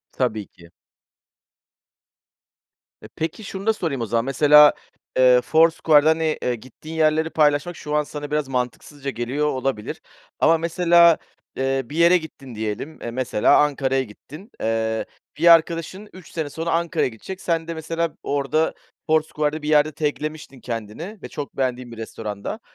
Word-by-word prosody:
Tabii 110 -6 -2
ki. 85 -1 -19 2.3
E, - - -11
peki, 165 +7 -4
şunu 195 0 -7
da 220 - +5
sorayım 160 - -3
o 115 - -2
zaman, 115 +2 0
mesela, 150 +2 +6 0.4
eee, 125 -1 +6
Foursquare'da, 160 0 +4
hani, 160 -1 0
eee, 125 - 0
gittiğin 130 +7 -10
yerleri 160 0 +2
paylaşmak 150 +2 +1
şu 150 0 -5
an 150 - +3
sana 145 0 -7
biraz 150 -2 -1
mantıksızca 135 +3 -4
geliyor 130 +5 -2
olabilir 130 -6 -3 0.4
ama 165 0 +4
mesela, 170 0 +4 0.4
eee, 135 0 0
bir 145 +6 -9
yere 170 +2 +5
gittin 135 -6 -11
diyelim, 110 +8 -5
eee, 120 - -5
mesela 120 -3 +2
Ankara'ya 135 -2 +1
gittin. 150 - -13
Eee, 110 0 -1 0.3
bir 170 - +1
arkadaşın 165 +5 +1
3 185 -3 -14
sene 155 -3 -3
sonra 165 +3 -3
Ankara'ya 170 -3 0
gidecek. 155 - -9
Sen 165 -2 -1
de 165 - -3
mesela 165 0 -3
orada 145 +3 0 0.3
Foursquare'da 155 -1 0
bir 150 - -4
yerde 155 0 +4
tag'lemiştin 150 -2 -4
kendini 120 - -6
ve - - -7
çok 145 -1 -7
beğendiğin 125 -2 -2
bir - - -9
restoranda. 110 - -6
150 Hz, 150 wpm, -22 LUFS, 125-160 Hz, 2.3 s, mesela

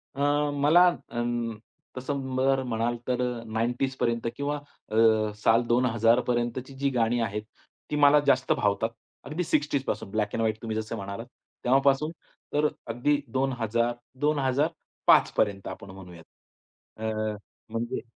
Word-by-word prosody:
अ, 140 - -8 0.3
मला 155 +6 +5 0.2
अं, 120 -1 -2 0.4
तसं 130 0 -3
बरं 135 0 +2
म्हणाल 115 +1 -1
तर 125 0 0 0.2
अ, - - -11
90ज 125 +4 0
पर्यंत 115 0 0
किंवा 145 +1 -2
अ, 145 -6 -11 0.4
साल 115 +2 +3
2000 120 -1 +3
पर्यंतची 120 +2 -1
जी 140 +1 0
गाणी 115 +1 +2
आहेत 105 -1 -2 0.5
ती, 150 - 0
मला 145 0 +6
जास्त 130 0 +3
भावतात. 105 +2 +1 0.4
अगदी 155 +5 -2
60ज 145 -4 0 0.3
ब्लॅक 105 -1 -1
अँड - - -1
व्हाईट 110 -1 0
तुम्ही 110 -2 -3
जसं 110 +1 -3
म्हणालात. 100 +2 -6 0.4
तेव्हापासून 135 +4 +3 0.4
तर 150 +1 +3 0.2
अगदी 140 +6 +1
2000, 120 -3 0 0.3
2005 145 +1 +2
पर्यंत 100 -2 +1
आपण 100 - -8
म्हणूयात. 90 -3 -12 0.7
अ, 110 - -8 0.7
म्हणजे 115 +1 -3
120 Hz, 130 wpm, -27 LUFS, 115-140 Hz, 0.7 s, मला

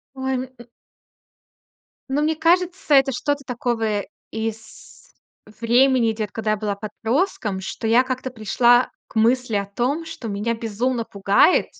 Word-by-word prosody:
Ой, 265 0 -2
м - - -2 1.7
Ну, 285 +2 +1
мне 310 +1 +1
кажется, 350 0 +2
это 270 -1 +5
что-то 285 +3 -2
такого 225 -4 -1 0.3
из 220 0 -7 0.5
времени 240 0 +3
идёт, 215 -2 -4
когда 220 -1 -1
я 215 - +1
была 205 -1 -2
подростком, 220 - -2
что 205 +3 -5
я 230 +3 +5
как-то 255 0 -4
пришла 240 +2 +3 0.2
к - - -19
мысли 235 0 +2
о 200 - -1
том, 255 +11 -2
что 260 -8 -7
меня 210 +3 -1
безумно 230 +2 -2
пугает 200 - +3
235 Hz, 135 wpm, -22 LUFS, 220-265 Hz, 1.7 s, это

